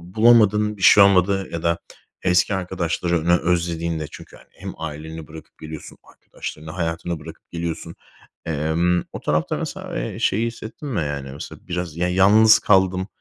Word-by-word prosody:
bulamadın, 105 -2 +4
bir 95 - -12
şey 100 - +8
olmadı 95 0 +3
ya 85 -1 -5
da 85 0 +1 0.4
eski 90 +2 +2
arkadaşlarını 85 -2 0
özlediğinde? 85 -2 -1
Çünkü, - - -12
hani, - - -18
hem - - -8
aileni 80 0 -7
bırakıp 80 0 -13
geliyorsun, 80 -1 -9 0.2
arkadaşlarını, 80 +1 -8
hayatını 85 -1 -3
bırakıp 80 +2 -13
geliyorsun. 85 -1 -5 0.5
Emm, 80 +3 0
o - - -5
tarafta - - 0
mesela, - - -5
eee, - - -5
şeyi 115 +4 +1
hissettin 115 +5 -8
mi, 105 -10 -1
yani, 70 -3 -4
mesela, 70 - -9
biraz 90 -2 -4
ya 90 +1 0
yalnız 105 +4 +6
kaldım? 95 -1 +2
85 Hz, 150 wpm, -22 LUFS, 80-95 Hz, 0.5 s, şey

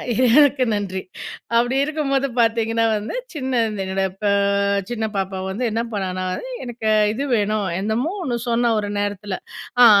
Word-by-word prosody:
இறைவனுக்கு 255 +3 +5
நன்றி. 195 -2 -2 0.6
அப்படி 240 +2 +3
இருக்கும்போது 280 -2 0
பார்த்தீங்கன்னா 230 0 +2
வந்து 210 - -4 0.2
சின்ன 260 -5 0 0.2
என்னோடய 190 0 -1
ப - - -2 0.6
சின்ன 225 -2 -2
பாப்பா 190 0 -2
வந்து, 210 +6 -3
என்ன 225 +2 0
பண்ணான்னா? 185 -2 -2
அது - - -7 0.2
எனக்கு 235 -2 -3 0.2
இது 270 +5 -2
வேணும் 210 -1 0
என்னமோ 220 - -1
ஒண்ணு 245 -5 -1
சொன்னா, 235 0 +2
ஒரு 205 -1 -3
நேரத்துல. 205 -1 -3 0.5
அ - - +11
225 Hz, 145 wpm, -21 LUFS, 205-255 Hz, 0.6 s, அ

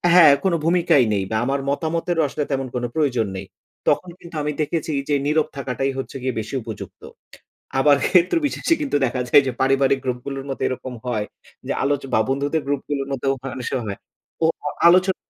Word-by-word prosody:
হ্যাঁ, 155 -5 +9
কোন 190 -3 +2
ভূমিকাই 170 -5 +4
নেই 100 -1 0
বা - - 0
আমার 135 +1 0
মতামতের 165 +3 -1
আসলে 150 - -3
তেমন 135 -1 -1
কোন 125 - -2
প্রয়োজন 125 -8 +1
নেই। 95 +1 -5 0.4
তখন 185 - +2
কিন্তু 170 -1 -12
আমি 150 - -1
দেখেছি 155 +1 -1 0.2
যে, - - +2
নীরব 155 +1 +2
থাকাটাই 135 0 -1
হচ্ছে 135 - -5
গিয়ে 130 -1 -1
বেশি 110 +5 -5
উপযুক্ত। 110 -2 -8 0.8
আবার 145 +1 +6
ক্ষেত্র 180 - +4
বিশেষে 330 +3 +1
কিন্তু 275 - +1
দেখা 125 +1 -2
যায় 140 - +7
যে, - - 0
পারিবারিক 135 0 +3
গ্রুপ 125 -1 -1
গুলোর 135 -1 -5
মতো 135 - -5
এরকম 130 0 -5
হয় 110 -4 -1 0.4
যে, - - -1
আলোচ 140 0 +1
বা - - +4
বন্ধুদের 145 +3 0
গ্রুপ 140 -1 0
গুলোর 140 -1 -2
মধ্যেও 135 0 0
হয়, 135 -1 -5
অনেক 125 - -5
সময় 130 -3 -1
হয় 100 - -5 0.4
ও - - +5 0.4
আলোচনা 185 +2 +4
140 Hz, 190 wpm, -22 LUFS, 130-160 Hz, 0.8 s, হ্যাঁ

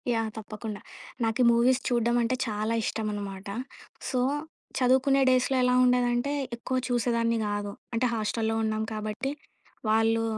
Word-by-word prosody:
Yeah! 225 -1 0
తప్పకుండ. 215 0 -6 0.5
నాకీ 225 +2 +1
movies 245 +2 +4
చూడ్డం 240 -1 +2
అంటే, 235 +2 +1
చాలా 215 +1 -1
ఇష్టం 220 0 -2
అనమాట. 200 -1 -6 0.6
సో, 255 - 0 0.6
చదువుకునే 265 +2 +4
డేస్‌‌లో 255 +1 +3
ఎలా 250 0 +3
ఉండేదంటే, 245 +1 +2 0.2
ఎక్కువ 245 +2 -4
చూసేదాన్ని 235 -1 +1
గాదు. 205 0 -2 0.2
అంటే 230 +2 +1
హాస్టల్‌లో 225 0 -1
ఉన్నాం 220 0 0
కాబట్టి, 215 +5 -3 0.6
వాళ్ళు 225 +1 +3
230 Hz, 125 wpm, -27 LUFS, 215-250 Hz, 0.6 s, movies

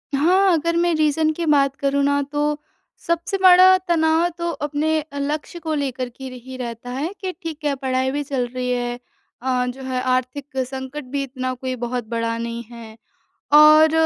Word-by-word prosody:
हाँ, 365 +6 +4
अगर 335 +1 0
मैं 345 0 +2
रीज़न 310 0 +2
की 340 +1 -3
बात 280 -3 +3
करूँ 280 0 +1
ना 285 0 +2
तो 295 0 0 0.5
सबसे 340 +3 0
बड़ा 370 0 +7
तनाव 320 -1 +3
है 350 - +2
तो 340 0 -2
अपने 300 +1 -1
अ, 285 -2 -8
लक्ष्य 300 +4 -3
को 320 -1 -3
लेकर 260 -4 -2
के 255 +3 -14 0.2
ही 260 0 -9
रहता 240 -1 -6
है 290 +9 -3
कि 375 -1 -2
ठीक 325 -2 -7
है, 285 - +1
पढ़ाई 260 -1 -1
भी 290 +1 -2
चल 270 -3 -2
रही 250 0 -2
है 245 -1 -1 0.5
अ, 250 -1 0
जो 255 +2 -6
है 255 -1 -2
आर्थिक 255 +2 -2
संकट 265 +2 -6
भी 280 -1 -1
इतना 255 -1 -4
कोई 255 0 -4
बहुत 240 -1 -3
बड़ा 230 0 -1
नहीं 235 0 -4
है 225 -2 -11 0.6
और 305 +1 +8
280 Hz, 190 wpm, -21 LUFS, 255-315 Hz, 0.6 s, और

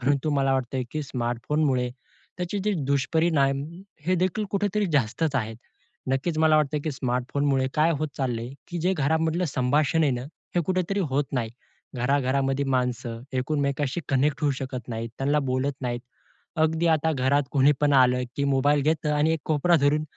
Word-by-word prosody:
परंतु 140 +3 +1
मला 135 0 +2
वाटतं 130 0 -1
की 155 - -3
स्मार्टफोनमुळे, 125 +1 -1 0.5
त्याचे 180 +3 -2
जे 210 - +2
दुष्परिणाम 140 0 +2 0.4
हे 185 - +3
देखील 185 +4 0
कुठेतरी 205 +1 0
जास्तच 140 +3 +1
आहेत. 110 -3 -2 0.5
नक्कीच 145 +5 0
मला 155 -1 +5
वाटतं 150 0 +1
की 155 - 0
स्मार्टफोनमुळे 130 +2 0
काय 155 +2 +3
होत 155 +1 -1
चाललंय, 120 -3 -2 0.2
की 175 - -4
जे 180 +3 +2
घरामधलं 160 +4 +1
संभाषण 145 +3 +1
आहे 150 - +3
ना, 120 0 -3 0.3
हे 175 - +3
कुठेतरी 185 +2 0
होत 140 +2 +1
नाही. 120 -4 -1 0.5
घराघरामध्ये 135 +1 +1
माणसं 125 -3 -1
एकमेकांशी 140 +2 -1
कनेक्ट 140 +2 +1
होऊ 145 - +3
शकत 130 -3 -6
नाहीत, 115 0 -4
त्यांना 145 +2 +2
बोलत 130 +2 0
नाहीत. 120 -2 -2 0.6
अगदी 160 +2 +2
आता 160 +1 +1
घरात 140 +1 +2
कोणीपण 145 +1 +3
आलं 125 -1 +4
की 140 - -1
मोबाईल 140 +1 +2
घेतं 155 +1 +1
आणि 150 +2 +3
एक 160 - -2
कोपरा 160 +3 +3
धरून 150 +2 +3
140 Hz, 160 wpm, -25 LUFS, 130-155 Hz, 0.6 s, मला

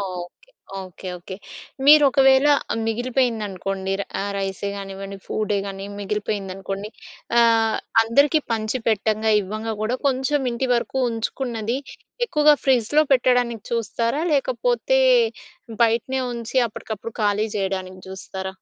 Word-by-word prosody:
Okay. 185 - -7 0.3
Okay. 185 0 -9
Okay. 180 +2 -9 0.5
మీరొకవేళ 275 -2 +6 0.4
మిగిలిపోయిందనుకోండి, 215 -5 -1
ర్ - - -2 0.2
ఆహ్, 200 - -2
rice 195 0 -3
గానివ్వండి, 195 0 -7
ఫూడ్డే 210 -1 -1
గానీ 195 0 -6
మిగిలిపోయిందనుకోండి 200 -1 -4 0.5
ఆహ్, 225 -1 +3 0.3
అందరికీ 280 +7 +3
పంచి 220 +3 -1
పెట్టంగా 220 0 +1
ఇవ్వంగా 215 +3 -4
గోడా 220 +4 0
కొంచెం 270 +2 +1
ఇంటి 240 +2 -2
వరకు 235 +2 -2
ఉంచుకున్నది, 230 0 -3 0.5
ఎక్కువగా 300 -6 +5
ఫ్రిజ్‌లో 265 +3 +3
పెట్టడానికి 245 -3 +2
చూస్తారా? 230 +4 -1
లేకపోతే, - - +1 0.8
బయటనే 235 +3 +1
ఉంచి 235 +2 -6
అప్పటికప్పుడు 220 +1 -7
ఖాళీ 210 +1 +2
చెయడానికి 190 -1 -3
చూస్తారా? 190 0 -6
225 Hz, 105 wpm, -22 LUFS, 195-255 Hz, 0.8 s, మీరొకవేళ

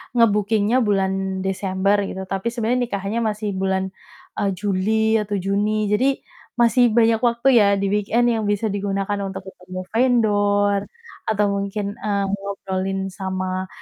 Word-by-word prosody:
nge-bookingnya 215 +1 +3
bulan 190 -3 0
Desember 195 +1 0
gitu, 190 - -5
tapi 195 +3 -3
sebenarnya 235 +1 0
nikahnya 200 +1 -2
masih 210 -1 -2
bulan, 190 0 -1 0.5
eee, 200 - +1
Juli 220 +3 +1
atau 205 0 -3
Juni 205 +2 0
jadi 250 +6 +3 0.5
masih 240 0 +4
banyak 225 -1 +4
waktu 235 +1 +1
ya 205 -2 +5
di 200 - 0
weekend 215 +4 +2
yang 220 -2 -1
bisa 205 +2 0
digunakan 200 0 -2
untuk 190 0 -5
ketemu 185 -1 -8
vendor 205 -4 +2 0.5
atau 210 -1 +2
mungkin, 200 +1 -2
eee, 200 -1 -1
ngobrolin 195 -1 -3
sama 185 0 -3
205 Hz, 135 wpm, -21 LUFS, 195-220 Hz, 0.5 s, ya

